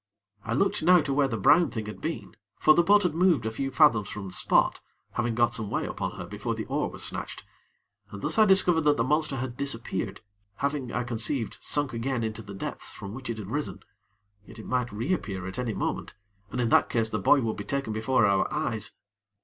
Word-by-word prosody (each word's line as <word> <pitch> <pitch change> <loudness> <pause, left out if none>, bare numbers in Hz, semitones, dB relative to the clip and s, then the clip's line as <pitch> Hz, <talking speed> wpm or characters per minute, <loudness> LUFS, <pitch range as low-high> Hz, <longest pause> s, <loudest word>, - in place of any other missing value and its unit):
I 115 +1 -3
looked 195 +11 +1
now 180 +3 +6
to 140 -2 -2
where 140 0 +3
the 115 -4 -3
brown 170 - +5
thing 110 -2 -4
had 105 - -8
been, - - -5 0.2
for 155 - +6
the 170 - +5
boat 205 +4 +5
had 180 -4 +1
moved 165 -8 +3
a 110 - -1
few 135 +4 -3
fathoms 120 -9 +4
from 100 -2 -6
the - - -9
spot, - - +2 0.3
having 120 -1 -1
got 120 0 +3
some 110 -2 -3
way - - -1
upon - - -4
her - - -7
before - - -4
the - - -4
oar - - -1
was - - -6
snatched, - - -3 0.7
and 100 - -8
thus - - +1
I 215 - +8
discovered 185 -4 +5
that 150 -1 +3
the 115 - +2
monster 150 +2 +1
had 125 -1 -4
disappeared, 115 -8 -3 0.3
having, 140 -2 -2
I 120 - -1
conceived, 120 +1 -3
sunk 145 -3 -1
again 120 +1 -2
into 110 0 -3
the 100 -2 -9
depths - - -5
from 100 0 -8
which 130 +1 -7
it 115 - -3
had 105 -1 -7
risen; 145 +2 -3 0.7
yet 110 +3 -13
it 110 - -9
might 125 -2 -1
re 115 - -1
appear 95 - -4
at 95 +6 -6
any 120 -4 -2
moment, - - -3 0.3
and 125 - -4
in 120 -2 +1
that - - +4
case 115 -2 +1
the 105 - -2
boy 135 +8 +4
would 115 -2 -1
be 105 - -5
taken 135 0 -2
before 110 +4 +2
our 100 -1 +2
eyes. 135 -9 -1
120 Hz, 230 wpm, -27 LUFS, 110-145 Hz, 0.7 s, I